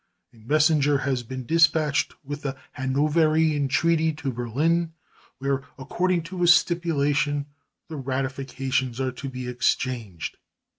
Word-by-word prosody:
A - - -20
messenger 145 +4 +3
has 135 -2 -1
been 130 +2 -7
dispatched 160 -1 +2
with 145 +1 -6
the 135 -1 -4
Hanoverian 150 +2 +2
treaty 160 +3 +2
to 145 -3 -4
Berlin, 155 +8 0 0.4
where, 140 0 -1 0.2
according 175 +6 0
to 175 +1 -1
stipulation, 145 -5 +2 0.4
the 160 - -7
ratifications 130 -1 -2
are 130 -1 0
to 135 +2 -7
be 125 -1 -6
exchanged. 120 -6 -2
140 Hz, 115 wpm, -25 LUFS, 130-160 Hz, 0.4 s, messenger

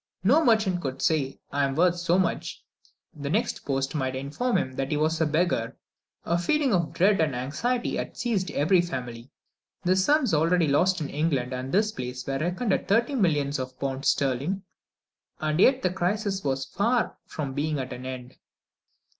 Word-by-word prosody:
No 280 +12 +5
merchant 215 - +2
could 135 -3 -4
say, 140 -4 0
"I 145 0 +1
am 135 -1 0
worth 175 +2 +3
so 175 0 +1
much;" 185 -3 -2 0.5
the 145 -1 -5
next 215 +8 -1
post 135 -1 -1
might 130 -4 -1
inform 145 - -1
him 130 - -2
that 135 +1 -3
he 150 - 0
was 155 +2 +1
a 160 - +3
beggar. 155 -7 0 0.5
A 170 +1 +1
feeling 275 - +1
of 170 -5 +1
dread 195 0 +3
and 150 -5 +1
anxiety 235 - -1
had - - -5
seized 205 -7 -1
every 155 +5 +3
family. 125 -7 -6 0.5
The 185 0 +3
sums 255 - +3
already 165 +2 +3
lost 180 +5 +2
in 150 - -3
England 140 -5 0
and 130 +1 -4
this 210 +2 +2
place 125 -5 -6
were 135 0 -2
reckoned 180 - 0
at - - -1
thirty 235 +7 +2
millions 150 - +1
of 130 0 -6
pounds 135 0 -2
sterling, 140 +9 0 0.8
and 155 +1 -1
yet 260 +6 +5
the 185 - +2
crisis 195 +2 -1
was 135 -1 -1
far 230 - 0
from 140 -4 -4
being 150 +2 -1
at 130 -1 -4
an 125 +1 -7
end. 130 -1 -8
155 Hz, 180 wpm, -26 LUFS, 135-190 Hz, 0.8 s, No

